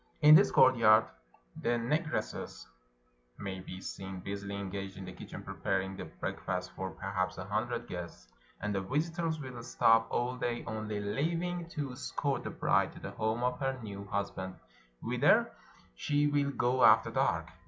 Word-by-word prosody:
In 150 Hz, +1 st, +10 dB
this 185 Hz, +6 st, +8 dB
courtyard 115 Hz, -4 st, +6 dB, 0.6 s
the 120 Hz, 0 st, +1 dB
Negresses 150 Hz, 0 st, -2 dB, 0.7 s
may 95 Hz, -2 st, -5 dB
be 90 Hz, 0 st, -8 dB
seen 95 Hz, 0 st, -6 dB
busily 100 Hz, +1 st, -5 dB
engaged 100 Hz, -1 st, -5 dB
in 95 Hz, -, -7 dB
the 95 Hz, -, -8 dB
kitchen -, -, -9 dB
preparing 95 Hz, 0 st, -2 dB
the -, -, -6 dB
breakfast 90 Hz, +9 st, -4 dB
for 95 Hz, 0 st, -4 dB
perhaps 95 Hz, -1 st, -2 dB
a 95 Hz, -, -5 dB
hundred 115 Hz, +4 st, -2 dB
guests; 85 Hz, -, -7 dB, 0.3 s
and 105 Hz, +1 st, -1 dB
the 95 Hz, -, 0 dB
visitors 160 Hz, -, -1 dB
will 130 Hz, -4 st, -7 dB
stop 115 Hz, -1 st, +4 dB
aU 125 Hz, +1 st, -1 dB
day, 120 Hz, -1 st, -2 dB
only 110 Hz, -1 st, -3 dB
leaving 165 Hz, +11 st, -1 dB
to 145 Hz, -5 st, -4 dB
escort 135 Hz, +1 st, -2 dB
the -, -, -4 dB
bride -, -, +1 dB
to -, -, -11 dB
the -, -, -6 dB
home 110 Hz, +2 st, -1 dB
of 125 Hz, 0 st, 0 dB
her 135 Hz, -1 st, -1 dB
new 100 Hz, -2 st, -6 dB
husband, 100 Hz, -2 st, -3 dB, 0.5 s
whither -, -, +3 dB, 0.4 s
she 145 Hz, -, +1 dB
will 145 Hz, -1 st, +2 dB
go 125 Hz, -1 st, +1 dB
after -, -, +6 dB
dark. -, -, 0 dB
110 Hz, 160 wpm, -32 LUFS, 95-135 Hz, 0.7 s, In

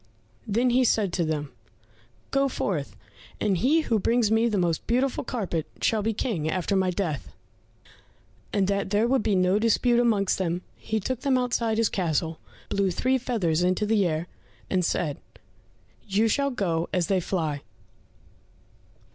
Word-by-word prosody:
Then 235 Hz, +4 st, +2 dB
he 255 Hz, +2 st, +4 dB
said 210 Hz, -6 st, +2 dB
to 175 Hz, -, +1 dB
them, 150 Hz, -3 st, -2 dB, 0.8 s
"Go 275 Hz, 0 st, +2 dB
forth, 175 Hz, -, -3 dB, 0.4 s
and 195 Hz, -4 st, +1 dB
he 300 Hz, -, +3 dB
who 230 Hz, -8 st, 0 dB
brings 230 Hz, +1 st, +2 dB
me 225 Hz, +1 st, +3 dB
the 210 Hz, -, 0 dB
most 170 Hz, -3 st, 0 dB
beautiful 255 Hz, +3 st, +1 dB
carpet 190 Hz, -, -3 dB
shall 220 Hz, -2 st, +1 dB
be 220 Hz, +2 st, 0 dB
King 200 Hz, -8 st, -2 dB
after 185 Hz, +3 st, -1 dB
my 190 Hz, -1 st, +2 dB
death." 175 Hz, -6 st, -3 dB, 1.2 s
And 195 Hz, -2 st, +1 dB
that 200 Hz, -1 st, -1 dB
there 210 Hz, +3 st, +2 dB
should 265 Hz, 0 st, +2 dB
be 210 Hz, -2 st, +1 dB
no 185 Hz, +2 st, +3 dB
dispute 235 Hz, +2 st, +3 dB
amongst 210 Hz, -6 st, +2 dB
them, 175 Hz, -1 st, -1 dB
he 220 Hz, 0 st, -2 dB
took 250 Hz, +4 st, -3 dB
them 265 Hz, -1 st, +2 dB
outside 235 Hz, -3 st, 0 dB
his 230 Hz, -1 st, +3 dB
castle, 165 Hz, -3 st, -1 dB, 0.3 s
blew 200 Hz, -1 st, +1 dB
three 255 Hz, +9 st, +1 dB
feathers 190 Hz, -10 st, 0 dB
in 180 Hz, +1 st, +2 dB
the 210 Hz, -1 st, +2 dB
air, 160 Hz, 0 st, -2 dB, 0.5 s
and 185 Hz, -1 st, +2 dB
said, 155 Hz, -3 st, -1 dB, 0.9 s
"You 210 Hz, +3 st, +2 dB
shall 280 Hz, +5 st, +1 dB
go 175 Hz, -9 st, -1 dB
as 180 Hz, -2 st, +1 dB
they 190 Hz, +2 st, +1 dB
fly." 160 Hz, -5 st, -2 dB
200 Hz, 160 wpm, -26 LUFS, 175-235 Hz, 1.2 s, he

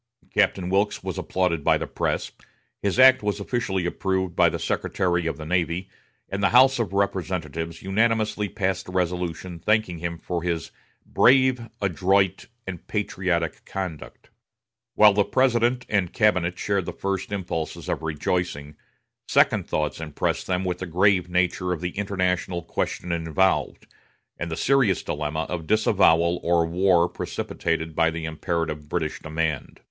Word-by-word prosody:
Captain 90 Hz, -2 st, +2 dB
Wilkes 100 Hz, +2 st, +1 dB
was -, -, -4 dB
applauded 90 Hz, -5 st, -1 dB
by -, -, +4 dB
the -, -, -4 dB
press; -, -, -2 dB, 0.5 s
his 100 Hz, +1 st, -1 dB
act 130 Hz, 0 st, +7 dB
was 105 Hz, 0 st, -1 dB
officially 100 Hz, -4 st, -2 dB
approved 95 Hz, 0 st, -1 dB
by -, -, +5 dB
the -, -, -3 dB
Secretary 85 Hz, -2 st, -1 dB
of 80 Hz, -, -3 dB
the 80 Hz, -, -7 dB
Navy, 90 Hz, +2 st, -1 dB, 0.4 s
and 100 Hz, +1 st, -4 dB
the 100 Hz, -, +3 dB
House 130 Hz, +1 st, +5 dB
of 110 Hz, -6 st, -1 dB
Representatives 85 Hz, -5 st, -2 dB
unanimously 105 Hz, +1 st, +1 dB
passed 95 Hz, +1 st, -2 dB
a -, -, -7 dB
resolution 90 Hz, -1 st, -2 dB
thanking 110 Hz, -3 st, +1 dB
him 85 Hz, 0 st, -4 dB
for 85 Hz, 0 st, -4 dB
his 85 Hz, -3 st, -3 dB, 0.3 s
"brave, 130 Hz, -2 st, +3 dB
adroit, 95 Hz, 0 st, +1 dB, 0.2 s
and 90 Hz, -3 st, -7 dB
patriotic 90 Hz, -5 st, -2 dB
conduct." 90 Hz, -6 st, -7 dB, 0.6 s
While 105 Hz, -1 st, +7 dB
the 105 Hz, +1 st, +3 dB
President 125 Hz, 0 st, +2 dB
and 100 Hz, -5 st, 0 dB
cabinet 90 Hz, -5 st, +2 dB
shared 100 Hz, -4 st, -1 dB
the -, -, -4 dB
first 95 Hz, 0 st, -3 dB
impulses 85 Hz, -5 st, -4 dB
of -, -, -2 dB
rejoicing, 75 Hz, -1 st, -2 dB, 0.5 s
second -, -, +3 dB
thoughts 75 Hz, 0 st, -2 dB
impressed 75 Hz, -3 st, -2 dB
them 95 Hz, 0 st, -1 dB
with 90 Hz, -1 st, -2 dB
the 95 Hz, -, -5 dB
grave 90 Hz, +1 st, +2 dB
nature 90 Hz, 0 st, 0 dB
of 90 Hz, -, -2 dB
the 90 Hz, +1 st, -3 dB
international 90 Hz, -3 st, -1 dB
question 90 Hz, -, -3 dB
involved, 85 Hz, +3 st, 0 dB, 0.5 s
and 85 Hz, -, -3 dB
the 80 Hz, -, -4 dB
serious 130 Hz, -9 st, +2 dB
dilemma 75 Hz, +1 st, -2 dB
of 80 Hz, -3 st, -5 dB
disavowal 90 Hz, -5 st, +3 dB
or 85 Hz, -1 st, +2 dB
war 90 Hz, 0 st, +3 dB
precipitated 80 Hz, -2 st, -3 dB
by 80 Hz, 0 st, +3 dB
the 80 Hz, 0 st, -5 dB
imperative 80 Hz, -1 st, -3 dB
British 80 Hz, -2 st, -2 dB
demand. 80 Hz, -2 st, -3 dB
90 Hz, 150 wpm, -24 LUFS, 85-100 Hz, 0.6 s, act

